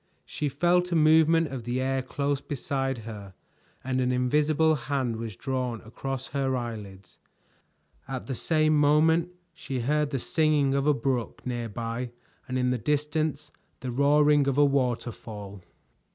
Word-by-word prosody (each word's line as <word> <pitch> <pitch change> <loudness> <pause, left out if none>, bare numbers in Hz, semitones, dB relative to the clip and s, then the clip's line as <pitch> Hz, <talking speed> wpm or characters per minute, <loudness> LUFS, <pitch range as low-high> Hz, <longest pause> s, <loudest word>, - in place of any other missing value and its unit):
She 150 - -3
felt 175 +5 +2
a - - +1
movement 160 +1 +5
of 130 -3 -6
the 120 +2 -2
air 135 0 0
close 140 +2 -2
beside 135 -1 -2
her 100 -4 -9 0.5
and 130 0 -1
an 125 0 +1
invisible 150 +5 +2
hand 135 -4 -2
was 110 -3 -6
drawn 125 -1 -3
across 130 +3 -5
her 135 -2 0
eyelids. 105 -5 -7 0.9
At 135 -2 -5
the 135 - -4
same 155 +3 +2
moment 155 +3 +4 0.2
she 135 -6 -4
heard 150 +4 +1
the 140 - -2
singing 150 0 +2
of 140 +1 +1
a 150 - +5
brook 130 -4 -2
near 120 -2 -3
by 115 +3 -4 0.4
and 130 -1 -2
in 125 0 +1
the 125 - -1
distance 150 +2 -1 0.3
the 130 - -4
roaring 145 +2 +4
of 140 0 0
a 145 - +6
waterfall. 115 -7 -2
135 Hz, 150 wpm, -27 LUFS, 125-150 Hz, 0.9 s, a